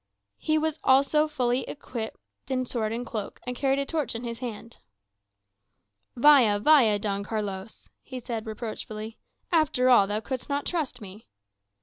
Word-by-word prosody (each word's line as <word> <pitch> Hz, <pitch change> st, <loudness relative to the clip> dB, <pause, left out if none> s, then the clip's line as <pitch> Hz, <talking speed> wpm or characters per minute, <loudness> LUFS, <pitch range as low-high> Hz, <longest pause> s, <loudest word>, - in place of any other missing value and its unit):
He 310 Hz, 0 st, +1 dB, 0.3 s
also 280 Hz, +3 st, +4 dB
was 310 Hz, -, -9 dB
fully 250 Hz, -3 st, +1 dB
equipped 240 Hz, -6 st, -6 dB, 0.3 s
in 255 Hz, -1 st, 0 dB
sword 225 Hz, -3 st, -2 dB
and 235 Hz, +2 st, -3 dB
cloak, 215 Hz, -4 st, -5 dB
and 250 Hz, 0 st, -3 dB
carried 270 Hz, +1 st, +1 dB
a 280 Hz, -, -1 dB
torch 285 Hz, -7 st, -2 dB
in 230 Hz, -, -5 dB
his 235 Hz, -1 st, -5 dB
hand. 235 Hz, -2 st, -7 dB, 1.4 s
"Vaya, 245 Hz, -6 st, +6 dB
vaya, 225 Hz, -3 st, +5 dB
Don 200 Hz, -1 st, -2 dB
Carlos," 205 Hz, -1 st, -5 dB
he 260 Hz, -1 st, -8 dB
said 230 Hz, -2 st, -5 dB
reproachfully; 220 Hz, 0 st, -6 dB, 0.3 s
"after 300 Hz, -6 st, +3 dB
all, 205 Hz, -5 st, +6 dB
thou 205 Hz, +1 st, -1 dB
couldst 260 Hz, +4 st, -5 dB
not 285 Hz, 0 st, -1 dB
trust 295 Hz, -8 st, -2 dB
me." 205 Hz, +2 st, -12 dB
240 Hz, 150 wpm, -27 LUFS, 215-270 Hz, 1.4 s, Vaya